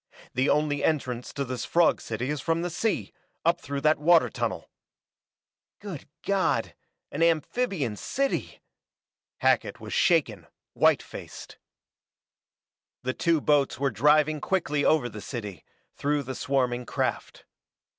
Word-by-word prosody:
"The 130 +3 +1
only 150 -1 +1
entrance 125 -6 -1
to 140 - -2
this 130 -1 -4
frog 170 -1 +3
city 120 +5 -3
is 150 -2 -3
from 165 +2 0
the 175 - -2
sea, 215 +6 -1 0.3
up 170 +1 +2
through 140 0 -4
that 155 +1 +3
water 165 +2 +5
tunnel!" - - -3 1.1
"Good 185 -9 -8 0.2
God, 195 -1 +1 0.4
an - - -4
amphibian 165 - +1
city!" 275 - -2 0.8
Hackett - - +2
was - - -7
shaken, 120 - +2 0.3
white - - +3
faced. - - -10 1.4
The 130 +1 -1
two 165 0 +1
boats 145 -4 +2
were 140 +1 0
driving 150 +1 +3
quickly 150 -6 0
over 155 -6 +3
the 105 -3 -8
city, 105 - -6 0.3
through 145 0 -1
the 130 0 -5
swarming 125 -2 -1
craft. - - -3
145 Hz, 130 wpm, -27 LUFS, 130-165 Hz, 1.4 s, water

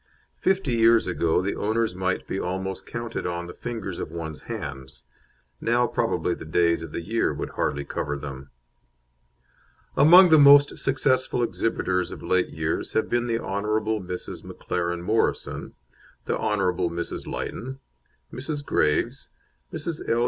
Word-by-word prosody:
Fifty 185 -9 +1
years 115 0 +5
ago 85 -1 +1
the 100 - -1
owners 110 -2 0
might 95 0 -1
be 95 - -2
almost 95 +1 -4
counted 115 -1 -4
on 85 0 -3
the 85 - -8
fingers 110 -6 -5
of - - -4
one's 80 -2 -6
hands; 65 -2 -7 0.6
now 120 +1 +2
probably - - 0
the - - -8
days 85 +1 +2
of 80 -2 -7
the 85 - -4
year 115 +7 0
would - - -5
hardly 70 0 -1
cover 75 0 -3
them. 70 -1 -8 1.5
Among 180 +5 +8
the 160 -1 +7
most 145 0 +7
successful 130 -2 +1
exhibitors 95 -5 -1
of - - -8
late 95 -1 +1
years 80 0 -3
have 110 - +1
been 120 0 +1
the 115 -1 +1
Hon. 100 -3 -3 0.4
Mrs. 90 0 -6
McLaren 85 -1 -3
Morrison, 110 +5 -1 0.5
the - - 0
Hon. 105 -1 0 0.3
Mrs. 85 +1 -5
Lytton, 130 +3 -5 0.5
Mrs. 145 +2 -4
Graves, 75 - 0 0.4
Mrs. 160 0 -4
L. 115 - +2
100 Hz, 145 wpm, -25 LUFS, 85-120 Hz, 1.5 s, Among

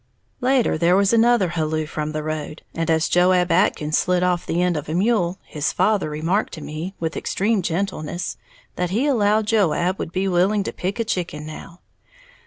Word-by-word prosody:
Later, 250 -9 +2
there 175 +2 +4
was 200 +2 +3
another 230 -4 +4
halloo 155 -2 -1
from 155 0 -4
the 155 0 -3
road, 155 0 -5
and 165 0 -2
as 160 0 +2
Joab 180 0 +3
Atkins 155 -3 +2
slid 180 0 +1
off 180 -1 0
the 170 - 0
end 180 -1 +2
of 150 0 -4
a 160 - -2
mule, 190 -2 +1
his 150 -2 -2
father 195 -2 +1
remarked 165 +7 -1
to 160 - -7
me, 160 +6 -6
with 165 0 -3
extreme 210 +1 0
gentleness, 175 -1 -3 0.4
that 180 -1 -1
he 225 +9 0
allowed 215 -6 +2
Joab 190 -3 +1
would 160 - -4
be 190 +2 -1
willing 190 +3 +2
to - - -4
pick 190 +6 -4
a - - +2
chicken 170 -7 -3
now. 165 +2 -10
180 Hz, 190 wpm, -22 LUFS, 160-200 Hz, 0.4 s, there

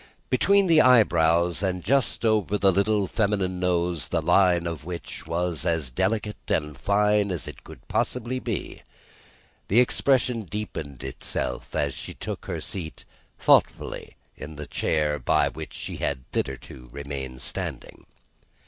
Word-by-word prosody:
Between 200 +9 +4
the 165 -3 +6
eyebrows 85 -8 +4
and 90 -2 -1
just 135 -3 +1
over 105 -2 +2
the 100 -1 +4
little 100 +2 +2
feminine 100 -3 0
nose, 90 -2 0
the - - 0
line 90 -3 +3
of 85 -3 -4
which 85 -2 -7
was 85 -1 -1
as 80 -6 0
delicate 105 - -1
and 75 0 0
fine 105 +5 +2
as 90 -5 -3
it 75 -4 -8
was - - -9
possible 125 -1 -1
to 130 0 -1
be, 115 -6 -4 0.9
the 110 - +4
expression 125 -1 +2
deepened 80 - -6
itself 65 - -4
as - - 0
she - - -7
took - - -6
her - - -3
seat 80 -5 -6 0.3
thoughtfully - - +2 0.2
in 75 +1 -9
the 75 +1 -6
chair 75 -1 0
by - - +2
which - - -8
she - - -6
had 65 -3 -2
hitherto 65 -2 -4
remained 70 -2 -6
standing. - - -5
90 Hz, 145 wpm, -25 LUFS, 75-105 Hz, 0.9 s, the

